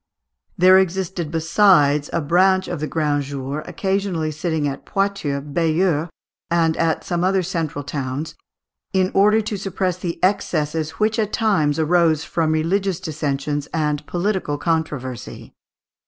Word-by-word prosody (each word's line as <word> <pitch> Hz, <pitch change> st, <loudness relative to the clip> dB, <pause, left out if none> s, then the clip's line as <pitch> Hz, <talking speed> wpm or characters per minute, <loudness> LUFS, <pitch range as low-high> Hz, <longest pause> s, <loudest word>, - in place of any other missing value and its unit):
There 185 Hz, +1 st, +7 dB
existed, 190 Hz, -2 st, -2 dB
besides, 160 Hz, -3 st, +3 dB
a 170 Hz, -, 0 dB
branch 185 Hz, +5 st, +3 dB
of 175 Hz, -, -4 dB
the 155 Hz, -, -2 dB
Grands 145 Hz, -3 st, 0 dB
Jours, 140 Hz, +2 st, -4 dB
occasionally 185 Hz, -3 st, -1 dB
sitting 155 Hz, -1 st, -1 dB
at 140 Hz, -1 st, -5 dB
Poitiers, 195 Hz, -9 st, -1 dB
Bayeux, 165 Hz, +2 st, 0 dB, 0.4 s
and 165 Hz, -2 st, +2 dB
at 165 Hz, -1 st, 0 dB
some 175 Hz, -1 st, -1 dB
other 190 Hz, 0 st, +2 dB
central 165 Hz, -5 st, -3 dB
towns, 145 Hz, +2 st, -4 dB, 0.6 s
in 185 Hz, -1 st, +2 dB
order 210 Hz, +3 st, +4 dB
to 215 Hz, -1 st, -4 dB
suppress 185 Hz, -2 st, -2 dB
the 175 Hz, -2 st, -4 dB
excesses 160 Hz, -5 st, 0 dB
which 220 Hz, +2 st, 0 dB
at 215 Hz, -1 st, 0 dB
times 185 Hz, -10 st, +1 dB
arose 160 Hz, -1 st, +2 dB
from 160 Hz, -2 st, 0 dB
religious 180 Hz, +4 st, 0 dB
dissensions 145 Hz, -4 st, -3 dB
and 150 Hz, -2 st, 0 dB
political 180 Hz, -5 st, -1 dB
controversy. 145 Hz, -7 st, -3 dB
165 Hz, 135 wpm, -21 LUFS, 150-190 Hz, 0.6 s, There